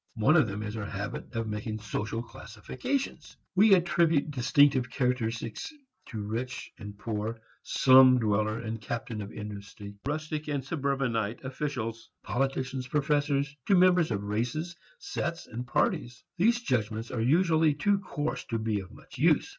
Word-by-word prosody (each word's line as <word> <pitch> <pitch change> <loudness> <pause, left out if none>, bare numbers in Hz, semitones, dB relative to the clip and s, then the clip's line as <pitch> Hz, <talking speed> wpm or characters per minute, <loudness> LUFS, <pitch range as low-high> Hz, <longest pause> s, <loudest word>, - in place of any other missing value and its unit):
One 120 +8 +4
of 155 -8 +5
them 105 +1 -4
is 105 0 -5
our 105 -2 -4
habit 100 +1 -5
of 115 -1 -1
making 110 +1 -3
social 110 +2 -3
classifications. 120 - -5 0.2
We 200 +1 +7
attribute 165 -4 +2
distinctive 135 0 +3
characteristics 120 - -2 0.4
to 110 -3 -5
rich 115 +5 -4
and 100 -1 -8
poor, 110 +1 -3 0.2
slum 130 -1 +6
dweller 110 -1 +1
and 115 -1 -5
captain 115 +1 -4
of 100 - -7
industry, 100 -1 -8
rustic 155 +1 -3
and 140 -3 -2
suburbanite, 135 -8 -1
officials, 130 -4 -4
politicians, 130 +1 -1
professors, 145 0 +1
to 200 - +5
members 180 -2 +5
of 100 -3 -2
races, 120 +12 -2 0.2
sets 170 0 -4
and 120 +2 -6
parties. 120 +1 0
These 235 +7 +3
judgments 115 - -1
are 115 - -2
usually 160 +3 +3
too 200 +7 +2
coarse 150 -6 -3
to 115 - -2
be 110 -2 -1
of 95 +1 -9
much 125 - -14
use. 160 - +3
125 Hz, 145 wpm, -29 LUFS, 110-150 Hz, 0.4 s, We